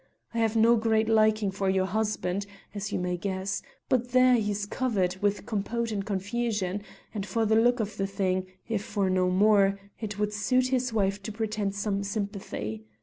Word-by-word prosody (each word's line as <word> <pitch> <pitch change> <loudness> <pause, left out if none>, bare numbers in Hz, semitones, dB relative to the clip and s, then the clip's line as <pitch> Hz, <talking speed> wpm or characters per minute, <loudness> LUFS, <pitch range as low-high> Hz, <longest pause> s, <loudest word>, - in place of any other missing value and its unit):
I 230 - -1
have 225 -1 +1
no 230 +1 +5
great 220 0 +2
liking 215 -2 +3
for 195 0 -1
your 190 0 +2
husband, 200 -1 -1 0.3
as 205 0 -4
you - - 0
may 180 0 -1
guess; 190 +2 -2 0.3
but 245 -1 0
there 255 0 +6
he's 210 -3 +1
covered 200 -6 0
with 205 0 0
compote 230 +2 -2
and 200 -2 -2
confusion, 205 -1 -2 0.3
and 205 -3 -3
for 225 +2 0
the 220 +1 +3
look 240 +2 +4
of 210 -1 -3
the 195 - 0
thing, 185 -2 -1 0.2
if 220 -3 -1
for 200 -3 0
no 185 0 +2
more, 200 +1 +4 0.2
it 210 -3 -4
would 210 0 -1
suit 255 +5 +2
his 255 -1 +1
wife 200 -2 0
to 205 - -5
pretend 210 -2 -2
some 200 -1 -1
sympathy. 200 - -4
205 Hz, 185 wpm, -28 LUFS, 195-225 Hz, 0.3 s, there